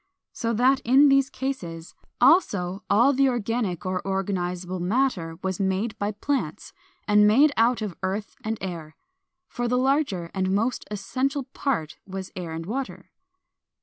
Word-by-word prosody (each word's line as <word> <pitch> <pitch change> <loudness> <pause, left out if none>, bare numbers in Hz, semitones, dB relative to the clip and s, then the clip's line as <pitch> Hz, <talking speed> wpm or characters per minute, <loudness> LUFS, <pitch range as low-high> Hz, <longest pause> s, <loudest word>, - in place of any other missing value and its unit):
So 230 -1 -2
that 255 +4 +3
in 275 +3 +5
these 275 -1 +4
cases 175 -14 -5 0.3
also 200 - +3
all 235 +7 +5
the 275 0 +3
organic 225 -6 -2
or 185 -1 -1
organizable 185 -2 -2
matter 180 -5 0
was 190 0 -2
made 195 +3 0
by 205 +1 -1
plants, 210 - -3 0.3
and 210 0 +5
made 275 +8 +5
out 230 0 +2
of 200 -5 -4
earth 195 +3 -3
and 220 +1 -2
air. 165 -5 -6 0.5
Far 245 -1 -3
the 250 +1 +1
larger 255 - 0
and 190 -1 0
most 230 +5 -1
essential 260 +8 -2
part 250 - -3
was 190 0 -6
air 175 -3 -5
and 165 0 -5
water. 260 +7 -5
210 Hz, 150 wpm, -25 LUFS, 185-255 Hz, 0.5 s, in